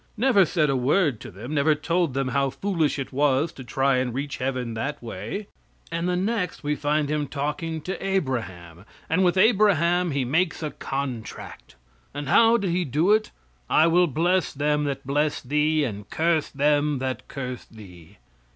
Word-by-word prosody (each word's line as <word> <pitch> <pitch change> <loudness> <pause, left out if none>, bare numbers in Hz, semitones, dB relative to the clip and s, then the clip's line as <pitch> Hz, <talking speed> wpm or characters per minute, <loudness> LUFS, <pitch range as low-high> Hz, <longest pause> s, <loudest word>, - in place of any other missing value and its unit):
Never 225 -5 +4
said 155 -2 +1
a - - +1
word 135 - +2
to - - -9
them; 110 - -8
never 150 +1 +3
told 165 -1 0
them 135 -1 0
how 135 +2 +1
foolish 165 -1 -1
it 135 -1 -5
was 145 +2 +2
to 130 - -10
try 135 +2 +1
and 125 -2 -1
reach 140 +1 -3
heaven 125 -3 -2
that 145 +7 -3
way. 115 - -6 0.5
And 170 +2 -1
the 180 - +1
next 190 -2 -2
we 145 +1 0
find 150 0 0
Him 150 0 -1
talking 150 +4 -3
to 185 +5 -5
Abraham, 115 - -3 0.3
and 180 +4 +3
with 180 0 +2
Abraham 185 -5 +3
He 140 -3 -1
makes 165 +5 0
a 150 - -2
contract. 135 - -6 0.4
And 145 -1 -4
how 230 +6 +5
did 195 -5 -1
He 180 +1 +1
do 160 - +1
it? 215 0 +3 0.4
"I 155 - +5
will 175 +2 +4
bless 175 +5 +1
them 150 +1 0
that 135 -1 -4
bless 145 +2 0
thee, 150 +3 +1
and 105 -6 -5
curse 160 -1 +1
them 145 0 +1
that 130 0 -4
curse 130 -3 -6
thee." 95 -4 -15
150 Hz, 180 wpm, -24 LUFS, 130-170 Hz, 0.5 s, how